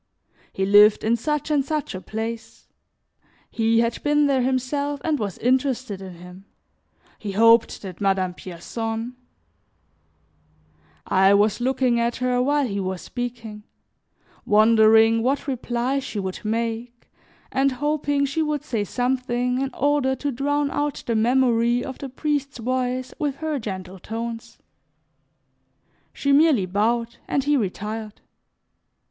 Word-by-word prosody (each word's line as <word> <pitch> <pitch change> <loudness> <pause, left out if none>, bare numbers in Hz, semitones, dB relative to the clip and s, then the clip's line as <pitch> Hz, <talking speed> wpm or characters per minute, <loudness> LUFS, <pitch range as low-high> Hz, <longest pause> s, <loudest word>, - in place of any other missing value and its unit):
He 190 - -1
lived 205 +1 +6
in 225 +2 +2
such 300 +5 -2
and 290 -2 +2
such 300 +1 -3
a 185 - -6
place; 225 +2 -6 0.8
he 225 0 +2
had 230 0 -1
been 295 0 +3
there 275 -2 +2
himself 265 +3 -1
and 310 -3 0
was 200 -4 -3
interested 255 -5 0
in 185 -2 -9
him; 180 +3 -13 0.7
he 205 -2 -5
hoped 230 +2 +4
that 185 -1 -8
Madame 190 -2 +1
Pierson 225 +7 -5 1.9
I 190 +1 +4
was 210 +3 +2
looking 255 -1 +1
at 235 0 0
her 250 -1 0
while 285 +2 +2
he 200 -4 -3
was 185 -1 -4
speaking, 230 -3 -6 0.8
wondering 220 +1 +5
what 265 +4 0
reply 255 0 -1
she 260 - -6
would 190 -1 -4
make 230 +2 -3 0.4
and 270 0 +2
hoping 290 +1 0
she 295 +4 -1
would 300 -2 -1
say 225 -4 -2
something 250 +2 -1
in 270 - -1
order 285 -1 +1
to 285 +2 -3
drown 285 +2 -1
out 290 -1 -2
the 230 - -1
memory 240 +1 +2
of 265 -2 -7
the 275 - -6
priest's 280 0 -2
voice 255 +1 -2
with 290 -3 -1
her 310 -1 -3
gentle 190 -3 -6
tones. 230 +3 -6 1.5
She 280 - -1
merely 285 - +4
bowed, 230 +5 0
and 275 - 0
he 295 +1 +2
retired. 215 -1 -4
240 Hz, 135 wpm, -23 LUFS, 215-275 Hz, 1.9 s, lived